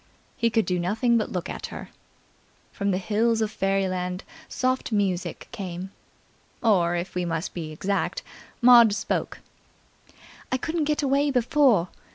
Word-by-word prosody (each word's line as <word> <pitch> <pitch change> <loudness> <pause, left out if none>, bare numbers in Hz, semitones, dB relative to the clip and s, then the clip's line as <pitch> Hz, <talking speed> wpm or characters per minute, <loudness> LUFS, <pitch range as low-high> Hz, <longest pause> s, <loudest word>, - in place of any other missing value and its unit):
He 230 - +1
could 225 -1 +1
do 180 -1 0
nothing 220 +7 +1
but 215 - -3
look 180 -2 -3
at - - -5
her. - - -9 0.8
From 200 -1 -2
the 185 - +1
Hills 220 +4 +1
of 215 -1 0
Fairyland 185 -2 -1 0.3
soft 255 -1 -1
music 195 -4 -1
came. 185 -1 -6 0.7
Or, 175 -6 +3
if 175 +1 -4
we 180 - -1
must 165 0 -3
be 160 -3 -5
exact, 200 - -2 0.4
Maud 235 -4 +8
spoke. - - -3 1.1
"I 255 - +2
couldn't 320 +3 -2
get 300 0 0
away 280 +1 +2
before!" 250 - +3
200 Hz, 145 wpm, -25 LUFS, 180-240 Hz, 1.1 s, Maud